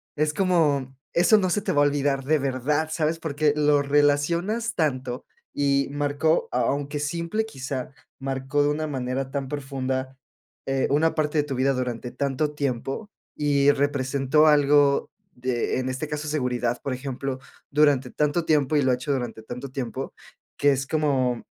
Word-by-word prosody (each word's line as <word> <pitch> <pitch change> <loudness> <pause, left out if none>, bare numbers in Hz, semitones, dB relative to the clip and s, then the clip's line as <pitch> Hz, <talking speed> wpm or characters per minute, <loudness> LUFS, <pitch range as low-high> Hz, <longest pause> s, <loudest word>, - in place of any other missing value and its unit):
Es 150 0 +1
como, 150 -9 +1 0.2
eso 175 +6 +5
no 185 -3 +1
se 205 +3 +1
te - - -1
va 145 - +3
a - - +4
olvidar 140 -1 0
de 155 +2 +3
verdad, 140 +4 0
¿sabes? 160 0 0
Porque 150 -2 +1
lo 150 -1 +3
relacionas 170 +11 +1
tanto 130 -4 -1 0.3
y 140 -1 +1
marcó 145 +2 +1
a 125 - +1
aunque 145 +1 -1
simple, 170 +8 -2
quizá 130 - -5 0.3
marcó 135 +1 -1
de 145 - +2
una 155 +1 -1
manera 130 -1 -3
tan 140 -2 -3
profunda, 135 -2 -3 0.5
eh, 135 -1 +1
una 155 +3 +2
parte 155 -1 +1
de 145 - +1
tu 140 - -4
vida 130 +2 +2
durante 125 -1 -3
tanto 140 +2 -1
tiempo 140 - -3 0.3
y 145 -1 +3
representó 140 +1 +2
algo 145 -1 +4 0.2
de 125 0 -1
en 130 - -2
este 130 +4 -3
caso, 150 0 -4
seguridad, 125 -5 -1
por 140 - -2
ejemplo, 135 0 -4 0.3
durante 140 -3 +3
tanto 150 +3 0
tiempo. 150 -1 +2
Y 145 - +4
lo 130 - +3
ha 125 - +3
hecho 125 +3 -2
durante 125 -4 -4
tanto 125 +4 -7
tiempo, 130 0 -4 0.4
que 145 0 +4
es 135 0 -2
como 135 -6 0
140 Hz, 165 wpm, -25 LUFS, 130-150 Hz, 0.5 s, eso